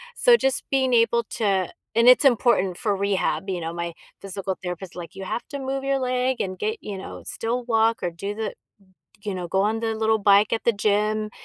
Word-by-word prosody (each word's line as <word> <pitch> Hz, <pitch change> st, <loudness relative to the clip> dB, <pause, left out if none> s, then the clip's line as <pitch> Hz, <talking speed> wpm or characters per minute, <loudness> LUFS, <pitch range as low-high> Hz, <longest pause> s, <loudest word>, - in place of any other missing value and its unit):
so 485 Hz, -1 st, +6 dB
just 270 Hz, -, +1 dB
being 265 Hz, -2 st, +2 dB
able 230 Hz, 0 st, +3 dB
to 195 Hz, -4 st, +1 dB, 0.3 s
and 230 Hz, +1 st, +4 dB
it's 250 Hz, +3 st, +8 dB
important 235 Hz, -8 st, +3 dB
for 205 Hz, -2 st, 0 dB
rehab, 195 Hz, 0 st, -1 dB
you 180 Hz, -2 st, -2 dB
know? 165 Hz, 0 st, -4 dB
My 170 Hz, 0 st, -4 dB, 0.3 s
physical 195 Hz, -1 st, -4 dB
therapist, 180 Hz, 0 st, -6 dB
like, 175 Hz, +2 st, -8 dB
"You 195 Hz, -, -7 dB
have 235 Hz, -, -3 dB
to 285 Hz, -, -5 dB
move 270 Hz, 0 st, -3 dB
your 275 Hz, 0 st, +1 dB
leg 255 Hz, 0 st, 0 dB
and 185 Hz, -1 st, -3 dB
get" 440 Hz, -, -2 dB
you 200 Hz, -2 st, -6 dB
know, -, -, -9 dB
"still 240 Hz, +2 st, -3 dB
walk 225 Hz, -1 st, +2 dB
or 175 Hz, -, -1 dB
do 195 Hz, +5 st, -5 dB
the" 220 Hz, 0 st, -3 dB, 0.7 s
you 205 Hz, -, -2 dB
know, 180 Hz, -2 st, -4 dB
"go 190 Hz, +3 st, +1 dB
on 220 Hz, +2 st, 0 dB
the 225 Hz, -1 st, -2 dB
little 220 Hz, 0 st, +1 dB
bike 205 Hz, +1 st, +4 dB
at 225 Hz, -, -2 dB
the 235 Hz, -, +4 dB
gym, 210 Hz, 0 st, 0 dB
215 Hz, 215 wpm, -24 LUFS, 190-240 Hz, 0.7 s, it's